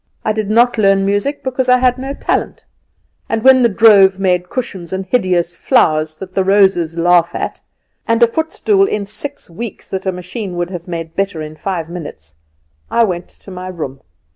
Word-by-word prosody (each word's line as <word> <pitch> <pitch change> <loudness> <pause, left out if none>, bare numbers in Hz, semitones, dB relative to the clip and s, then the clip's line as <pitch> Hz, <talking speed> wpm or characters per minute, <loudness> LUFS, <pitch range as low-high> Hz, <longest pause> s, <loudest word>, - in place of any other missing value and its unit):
I 215 - +1
did 215 -1 -3
not 235 +2 +3
learn 195 -1 +3
music, 205 +9 -1
because 260 -1 -1
I 250 - +6
had 250 0 +1
no 270 +2 -5
talent; - - -2 0.6
and 225 -1 -1
when 265 -1 +7
the 235 - +4
drove 200 -3 +5
made 180 -2 0
cushions, 190 -9 -5
and 190 0 -3
hideous 180 -5 0
flowers 155 - +2
that 185 +3 -10
the 190 - +1
roses 190 -4 +2
laugh 175 0 +3
at, - - -4 0.5
and 230 +1 +3
a - - +9
footstool 320 - +1
in 210 - -2
six 270 +8 -3
weeks 205 +5 -7
that 190 0 -4
a - - +2
machine 180 +2 -6
would 175 +1 -2
have 175 -1 -7
made 165 -2 -6
better 195 -5 -2
in 155 0 -8
five 170 -1 -4
minutes, 145 - -8 0.6
I 235 - +3
went 180 -5 -2
to 195 - -14
my 185 0 -7
room. 155 -7 -6
195 Hz, 190 wpm, -16 LUFS, 175-230 Hz, 0.6 s, a